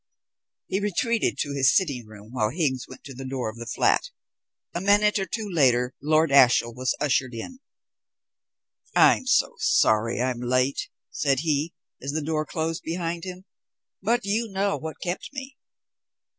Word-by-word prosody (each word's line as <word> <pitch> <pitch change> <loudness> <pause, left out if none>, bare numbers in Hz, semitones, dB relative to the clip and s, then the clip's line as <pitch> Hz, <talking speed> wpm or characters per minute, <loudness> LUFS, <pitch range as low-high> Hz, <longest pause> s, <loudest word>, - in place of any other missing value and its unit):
He 190 - -1
retreated 220 +3 0
to 145 - -3
his 140 +2 +3
sitting 140 - 0
room 110 0 -13
while 110 -4 0
Higgs 135 -3 -1
went - - -13
to 135 - -9
the 135 +2 -8
door 130 -4 -3
of 110 - -16
the 115 0 -8
flat. - - +1 0.6
A 175 - -3
minute 205 +1 +3
or 195 - -2
two 220 +4 -4
later 130 -8 +2
Lord 155 +1 +2
Ashiel 125 -3 +5
was 130 +1 -1
ushered 130 -4 0
in. 255 - -7 1.4
"I'm 260 - +5
very 255 - +3
sorry 115 - +2
I'm 125 -1 -1
late," 130 +2 0 0.2
said 135 -2 +1
he, 155 0 -1 0.3
as 140 +2 -4
the 155 0 -1
door 155 0 -1
closed 165 +2 -2
behind 170 +1 -3
him, 185 0 -8 0.6
"but 230 +3 +1
you 220 +3 0
know 195 0 0
what 160 0 -6
kept 175 0 -4
me." 270 -1 -7
155 Hz, 160 wpm, -25 LUFS, 130-190 Hz, 1.4 s, Ashiel